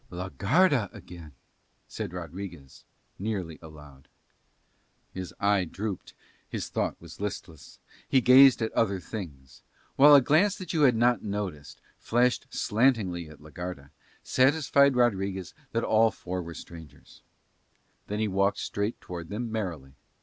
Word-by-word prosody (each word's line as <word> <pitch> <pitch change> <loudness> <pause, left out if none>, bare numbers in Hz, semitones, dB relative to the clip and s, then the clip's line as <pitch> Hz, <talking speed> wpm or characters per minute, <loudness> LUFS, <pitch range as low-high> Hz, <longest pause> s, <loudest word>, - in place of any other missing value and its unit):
"La 90 +1 -6
Garda 130 - +2
again," 85 -4 -11 0.6
said - - -6
Rodriguez 85 -5 -9 0.3
nearly 95 -6 -4
aloud. 75 -4 -14 1.1
His 95 -1 -6
eye 100 -1 +2
drooped, 100 +3 -6 0.3
his - - -6
look - - -1
was 85 +2 -13
listless, 90 -6 -7 0.3
he 135 - +4
gazed 130 0 +7
at 110 - -2
other 100 -4 0
things; 75 - -9 0.4
while 145 +2 +9
a - - +9
glance 160 +10 +3
that 185 -3 -6
you 160 - +1
had 130 -5 +5
not 120 +1 +2
noticed, 100 -8 -5 0.2
flashed 125 +2 +1
slantingly 105 -8 0
at 75 -1 -15
la 75 0 -14
Garda, 85 -5 -7 0.3
satisfied 140 0 +3
Rodriguez 95 -6 0 0.2
that 115 - -1
all 110 +1 +4
four 90 -3 -5
were 85 -1 -8
strangers: 80 -5 -13 0.9
then 105 - -3
he 110 0 0
walked 100 +1 +1
straight 100 +3 -3
towards 85 -2 -8
them 115 +2 -4
merrily. 85 -12 -4
100 Hz, 135 wpm, -27 LUFS, 85-120 Hz, 1.1 s, while